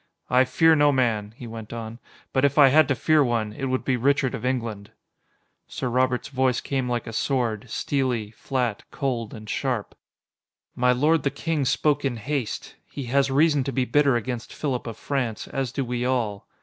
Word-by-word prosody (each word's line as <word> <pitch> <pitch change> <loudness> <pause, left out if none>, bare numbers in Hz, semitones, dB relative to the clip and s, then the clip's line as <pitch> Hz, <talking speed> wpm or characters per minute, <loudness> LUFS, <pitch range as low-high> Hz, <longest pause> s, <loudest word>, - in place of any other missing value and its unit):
"I 130 +1 +5
fear 160 +5 +4
no 145 -1 +4
man," 110 -5 0
he 125 - -8
went 115 -2 -8
on, 115 0 -6 0.3
"but 130 - +2
if 140 +1 +2
I 140 -2 +8
had 155 +3 +5
to 135 - +1
fear 155 +5 +3
one, 115 -4 -1
it 135 - -4
would 130 -1 -1
be 130 -2 +1
Richard 135 +1 +2
of - - -5
England." 115 -5 -2 0.8
Sir 130 - -3
Robert's 125 +1 +1
voice 130 -3 +1
came 130 -3 -2
like 120 -2 -1
a 115 - -7
sword: 120 -3 -1
steely, 125 -4 -1
flat, 120 -2 -2
cold, 120 -5 -2
and 110 -1 -10
sharp. 125 -2 -2 0.8
"My 125 0 +3
lord 150 +6 +3
the 140 - +1
King 155 -1 -2
spoke 145 +2 +1
in 130 -4 -1
haste. 125 0 -4
He 140 - -6
has 140 0 +3
reason 145 +1 +3
to 135 - -3
be 130 0 0
bitter 140 +1 +3
against 120 0 -4
Philip 130 -5 -2
of 115 -2 -6
France, 125 -6 -2
as 135 -3 -3
do 135 0 -2
we 125 0 -2
all. 115 -6 -1
130 Hz, 190 wpm, -25 LUFS, 115-140 Hz, 0.8 s, I